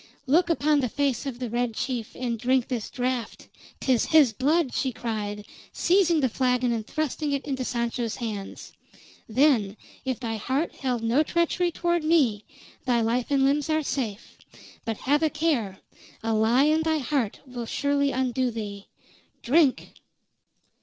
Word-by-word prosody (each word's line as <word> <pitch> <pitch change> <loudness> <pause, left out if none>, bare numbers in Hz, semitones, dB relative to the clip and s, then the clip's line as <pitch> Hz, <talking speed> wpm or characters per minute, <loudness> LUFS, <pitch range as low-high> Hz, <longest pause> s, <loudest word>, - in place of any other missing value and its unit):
"Look 335 +6 +3
upon 305 -2 +2
the 250 -3 0
face 280 0 -1
of 255 -3 -4
the 250 0 -4
Red 240 -1 -1
Chief, 240 -3 -3
and 240 -3 -3
drink 255 +1 +2
this 240 -4 -3
draft 250 -2 -3 0.3
'tis 255 -4 +2
his 295 -8 +5
blood!" 285 +3 +1
she 265 - 0
cried, 210 -3 -4 0.3
seizing 345 -3 +3
the 260 - +3
flagon 250 0 +1
and 225 -2 -3
thrusting 310 -1 -2
it 280 - -2
into 265 -3 -2
Sancho's 235 -2 -2
hands. 215 -5 -6 0.6
"Then, 225 -5 +3 0.3
if 260 -3 -2
thy 225 -3 -3
heart 265 +9 -1
held 250 -4 -2
no 235 +6 +3
treachery 340 +2 +1
toward 345 0 0
me, 275 -10 +2 0.4
thy 240 -2 +2
life 235 +2 0
and 275 -1 +3
limbs 285 +2 +1
are 310 0 +1
safe. 235 -7 -4 0.5
But 225 -2 -2
have 290 +3 +3
a 315 - +3
care! 290 -12 -1 0.5
A 225 0 0
lie 225 +5 +4
in 310 +2 +3
thy 320 0 +1
heart 265 -6 -1
will 245 -3 -6
surely 280 +2 +1
undo 255 0 0
thee. 205 -3 -6 0.6
Drink!" 285 +1 +2
255 Hz, 160 wpm, -26 LUFS, 230-295 Hz, 0.6 s, his